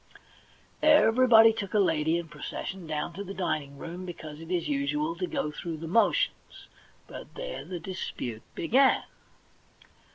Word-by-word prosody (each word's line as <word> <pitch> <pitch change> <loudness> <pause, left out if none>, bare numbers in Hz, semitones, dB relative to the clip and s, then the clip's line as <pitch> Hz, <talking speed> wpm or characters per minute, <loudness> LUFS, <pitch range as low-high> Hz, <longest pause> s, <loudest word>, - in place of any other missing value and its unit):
Everybody 240 -6 +6
took 210 -2 -5
a - - +5
lady 160 -3 +2
and 170 -1 -5
processioned 170 +3 -6
down 155 +2 -3
to 200 +4 -6
the 195 0 -8
dining 150 -6 -2
room, 170 +5 -7
because 155 -4 -8
it 165 - -10
is 180 -2 -1
usual 295 +3 -1
to 365 - -2
go 275 - -2
through 165 +1 -5
the 165 +1 -7
motions; 225 +7 0 0.4
but - - -11
there - - -5
the 180 -2 -6
dispute 125 - -5
began. 260 +10 +3
185 Hz, 150 wpm, -28 LUFS, 160-240 Hz, 0.4 s, Everybody